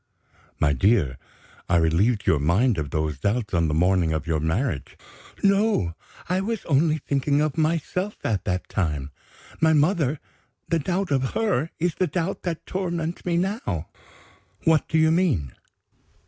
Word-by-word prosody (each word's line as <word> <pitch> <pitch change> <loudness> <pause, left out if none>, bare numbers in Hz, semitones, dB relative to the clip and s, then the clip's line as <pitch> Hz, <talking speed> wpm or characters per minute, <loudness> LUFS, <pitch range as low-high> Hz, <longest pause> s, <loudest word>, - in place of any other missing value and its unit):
"My 75 -1 +3
dear, 75 - +2 0.5
I 85 - +3
relieved 85 +7 +2
your 80 - +3
mind 95 - +2
of 75 -2 -3
those 75 -1 -2
doubts 105 - -1
on 85 -2 +2
the 75 - -1
morning 90 -1 +2
of 80 - -2
your 80 -2 0
marriage." 80 - -2 0.5
"No. 200 - +2 0.3
I 185 +2 +1
was 225 +1 -3
only 155 +2 +2
thinking 140 -1 0
of 150 -1 0
myself 165 +5 -1
at 105 -6 -1
that 90 -1 -2
time. 75 -7 -2 0.5
My 160 0 +4
mother 150 -2 +2 0.5
the 165 - +1
doubt 180 +3 -1
of 130 -2 0
her 185 - +1
is 175 +1 0
the 185 - 0
doubt 180 +2 -2
that 170 -3 -4
torments 175 -3 -3
me 170 -1 +1
now." 180 - -2 0.7
"What 160 -2 +3
do 160 - +1
you 160 0 +4
mean?" 145 - +1
135 Hz, 155 wpm, -24 LUFS, -, 0.7 s, My